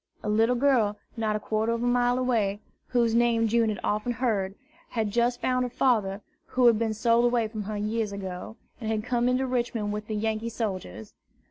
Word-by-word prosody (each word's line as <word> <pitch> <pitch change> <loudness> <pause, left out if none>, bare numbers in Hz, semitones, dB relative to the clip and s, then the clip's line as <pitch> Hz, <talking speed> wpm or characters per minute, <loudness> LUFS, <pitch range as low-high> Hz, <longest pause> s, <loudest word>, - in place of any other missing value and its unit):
A - - -2
little 225 +3 +3
girl, 240 -6 +2 0.2
not 220 -2 0
a - - -1
quarter 220 +2 0
of 230 0 -2
a - - +1
mile 245 0 +2
away, 225 -6 +1 0.3
whose 235 -2 +2
name 230 -1 +3
June 230 0 +2
had 210 - -3
often 215 +4 0
heard, 215 -6 -1 0.3
had 220 -3 -1
just 240 +2 +1
found 255 0 +1
her 250 - -2
father, 215 -6 +1 0.3
who 255 -1 +1
had 230 -3 +6
been 220 -1 0
sold 230 +1 +3
away 240 -2 +2
from 215 0 -5
her 210 +1 -4
years 215 +1 -1
ago, 190 +1 -6 0.2
and 220 -3 -4
had 215 -1 -1
come 245 0 +1
into 255 +1 +1
Richmond 235 -4 -1
with 210 0 -5
the 215 - -3
Yankee 220 +1 -1
soldiers. 185 - -5
225 Hz, 205 wpm, -27 LUFS, 210-240 Hz, 0.3 s, had